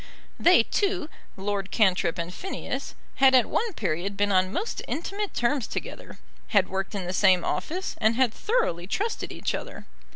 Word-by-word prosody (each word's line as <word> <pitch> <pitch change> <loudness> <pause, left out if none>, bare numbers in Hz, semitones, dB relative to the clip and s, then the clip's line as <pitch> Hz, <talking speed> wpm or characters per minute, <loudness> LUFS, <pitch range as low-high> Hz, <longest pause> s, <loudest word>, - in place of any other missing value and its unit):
They 350 -9 +6
two, 370 - -1 0.3
Lord 195 0 -2
Cantrip 185 -5 +2
and 170 +1 -4
Phineas, 385 - -5 0.2
had 265 -1 +6
at 250 -3 +6
one 460 0 -1
period 195 - -2
been 205 0 +2
on 185 -1 +3
most 415 - -3
intimate 400 +5 -3
terms 240 0 +1
together; - - -7 0.3
had 200 -4 +3
worked 195 +2 -3
in 195 -3 -3
the 180 - -3
same 185 -2 +4
office, 345 - -2
and 220 0 +3
had 250 -3 +2
thoroughly 185 - 0
trusted 425 - -2
each - - -2
other. - - -6
210 Hz, 165 wpm, -26 LUFS, -, 0.3 s, They